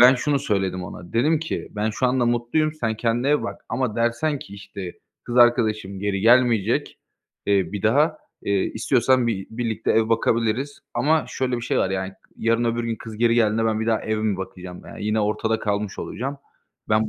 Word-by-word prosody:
ben 125 +2 +9
şunu 140 +3 +1
söyledim 95 -8 -1
ona. 85 0 -10
Dedim 150 +8 +3
ki 160 +2 -4
"Ben 105 +1 -1
şu 125 +4 0
anda 125 -1 +2
mutluyum. 120 +6 +1
Sen 115 -7 -1
kendine 120 +3 0
ev 150 +1 +3
bak - - -5
ama 125 -5 -1
dersen 120 +6 +1
ki, 100 - -10
işte, 100 -2 -7 0.3
'Kız 120 - -4
arkadaşım 110 -5 +3
geri 100 -1 -1
gelmeyecek, 115 -2 +3 0.5
eee, 100 -1 +2
bir 100 - -4
daha.' 150 +8 +3 0.3
eee, 100 -1 +2
istiyorsan 125 +2 +2
bi 100 -5 -2
birlikte 115 -1 -2
ev 110 0 +3
bakabiliriz." 115 +4 0
ama 155 +2 +2
şöyle 130 -1 -1
bir 120 - -4
şey - - 0
var, 95 - +1
yani, 95 0 -2 0.2
yarın 115 +1 +1
öbür 115 0 0
gün 115 -1 -2
kız 110 -1 -9
geri 115 +1 +3
geldiğinde 115 -1 +2
ben 110 -1 +1
bir 110 - -2
daha 110 -1 +2
ev 110 0 -1
mi 105 -3 0
bakacağım, 90 -1 -8
yani. - - -8
Yine 105 +1 +1
ortada 110 +1 0
kalmış 105 -1 -2
olacağım. 135 +3 -4 0.5
Ben 110 0 +2
115 Hz, 195 wpm, -23 LUFS, 105-125 Hz, 0.5 s, ben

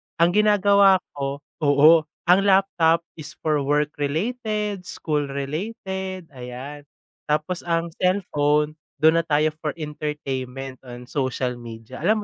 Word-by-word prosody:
ang 170 +1 +4
ginagawa 200 -2 +5
ko 140 0 -4 0.2
oo, 150 +2 +5 0.2
ang 185 - +7
laptop 175 -4 +3 0.2
is 155 0 -9
for 155 -2 +2
work 145 +1 +1
related, 210 - -2
school 150 -2 -2
related, 185 - -5
ayan. 135 +3 -8 0.4
Tapos 155 +4 0
ang 165 0 0
cellphone, 150 -5 +1 0.3
dun 160 +1 +6
na 165 - -2
tayo 155 +1 +2
for 155 -2 -3
entertainment 135 -4 -5
on 120 0 -9
social 130 -2 -2
media. 115 -1 -10
Alam 210 +6 +1
155 Hz, 125 wpm, -23 LUFS, 140-185 Hz, 0.4 s, ang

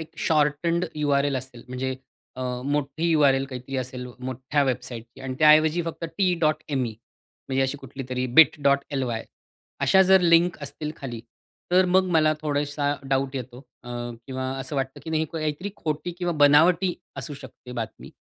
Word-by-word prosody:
एक 160 0 -8
shortened 160 +3 +1
U-R-L 140 -2 +2
असेल, 125 -2 -11
म्हणजे 130 +1 -3 0.4
अ, 130 - -3 0.2
मोठी 145 +3 0
U-R-L 135 -3 +4
काहीतरी 130 +1 -6
असेल, 125 -1 -4
मोठ्या 130 +3 -1
वेबसाईटची 125 -1 -4
आणि 130 -1 -4
त्याऐवजी 155 +2 +5
फक्त 165 0 -5 0.2
T.ME 155 - +1 0.6
म्हणजे 135 0 +1
अशी 135 +2 -1
कुठली 135 -1 -8
तरी 125 0 -1
Bit.ly 140 -5 +3 0.6
अशा 190 0 +6
जर 190 0 +6
लिंक 170 0 +4
असतील 150 +2 -5
खाली, 120 -4 -6 0.5
तर 185 +1 +5
मग 190 0 +6
मला 155 -1 +4
थोडासा 145 -1 0 0.2
डाऊट 135 0 0
येतो 125 -1 -6 0.2
अ, 120 - -11 0.4
किंवा 130 -1 -3
असं 135 +2 -5
वाटतं 135 -1 -3
की 160 - -6
नाही 160 0 +1
काहीतरी 155 +4 -3
खोटी 155 +3 -3
किंवा 175 -1 -1
बनावटी 170 +5 +5 0.3
असू 150 - -6
शकते 125 0 -12
बातमी 110 - -7
145 Hz, 150 wpm, -25 LUFS, 130-160 Hz, 0.6 s, अशा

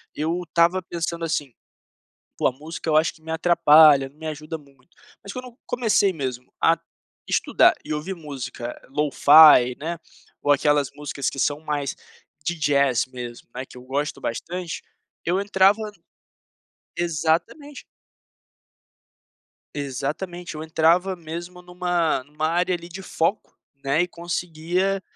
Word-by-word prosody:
eu 165 +4 -1
estava 170 +3 +3
pensando 170 -1 -4
assim: 145 -6 -2 0.8
"Poxa, - - -2
a - - +1
música 155 +4 -7
eu 155 - +2
acho 155 +2 +4
que 160 - -22
me 160 - -6
atrapalha, 155 -4 +6
me 155 +3 -9
ajuda 155 +1 -5
muito". 140 +3 -23 0.3
Mas 200 - -8
quando 255 0 -6
eu 245 0 -13
comecei 220 -5 +2
mesmo 130 -4 -5
a - - +4 0.5
estudar - - +4
e - - -8
ouvir 155 +6 -3
música 135 -7 -7
LoFi, 145 -3 +7
né, 165 +3 -4 0.5
ou 145 - +3
aquelas 145 -1 +2
músicas 145 -2 -4
que 135 - -8
são 145 +2 +1
mais 145 -3 -3 0.5
de 175 - -1
jazz 140 -5 +2
mesmo, 120 -2 -8
né, 130 - -4
que 125 - -15
eu 125 - -11
gosto 140 +3 -3
bastante, 175 +8 -4 0.4
eu 180 +3 +1
entrava 200 +1 +3 1.2
exatamente. 175 - -1 1.9
Exatamente. 150 +6 -4
Eu 155 - -5
entrava 170 +4 +2
mesmo 175 +2 -8
numa 175 -5 -1
numa 150 +2 -3
área 175 +2 +1
ali 170 0 -5
de 190 +3 -8
foco, 170 +5 -1 0.3
né, 140 +5 +2
e 180 - 0
conseguia 175 +2 -2
160 Hz, 135 wpm, -23 LUFS, 145-175 Hz, 1.9 s, LoFi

